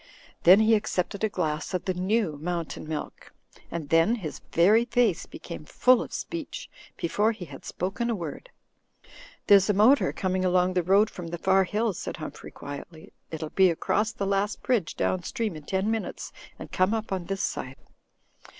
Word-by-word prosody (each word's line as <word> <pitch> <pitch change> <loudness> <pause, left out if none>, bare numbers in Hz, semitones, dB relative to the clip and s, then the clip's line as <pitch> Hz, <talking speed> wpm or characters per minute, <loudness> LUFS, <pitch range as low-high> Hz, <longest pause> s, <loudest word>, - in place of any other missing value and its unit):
Then 185 +5 +8
he 220 +1 +4
accepted 200 -1 -1
a 220 - +2
glass 155 -3 -2
of 180 - -3
the 185 - 0
new 185 -1 0
Mountain 170 -2 -4
Milk; 155 -1 -6 0.4
and 160 -4 -5
then 165 +8 +4
his 175 -10 -6
very 210 +8 +5
face 240 -7 +1
became 170 -3 -9
full 250 +10 +3
of - - -7
speech, 330 -4 -6 0.3
before 210 +6 +1
he 195 -5 -8
had 140 -4 -11
spoken 200 +7 -3
a 230 - +1
word. 175 - -7 1.0
"There's 200 0 +6
a 205 - +3
motor 230 +8 +5
coming 185 -1 -1
along 180 0 +2
the 180 - +2
road 195 +5 +3
from 175 -2 -7
the 170 +1 -5
far 190 +2 +3
hills," 210 +1 -1
said - - -5
Humphrey, - - -8
quietly. 150 +3 -10 0.2
"It'll 155 -1 -5
be 190 -1 +5
across 210 +6 0
the 200 - -4
last 200 +1 -1
bridge 230 -10 0
down 185 - 0
stream 225 -2 -3
in 155 -1 -10
ten 190 +5 0
minutes 225 -2 -4 0.3
and - - -10
come 185 +4 +2
up 220 -2 -4
on 185 -2 -2
this 195 +2 -3
side." 130 +1 -4
190 Hz, 180 wpm, -27 LUFS, 170-215 Hz, 1.0 s, Then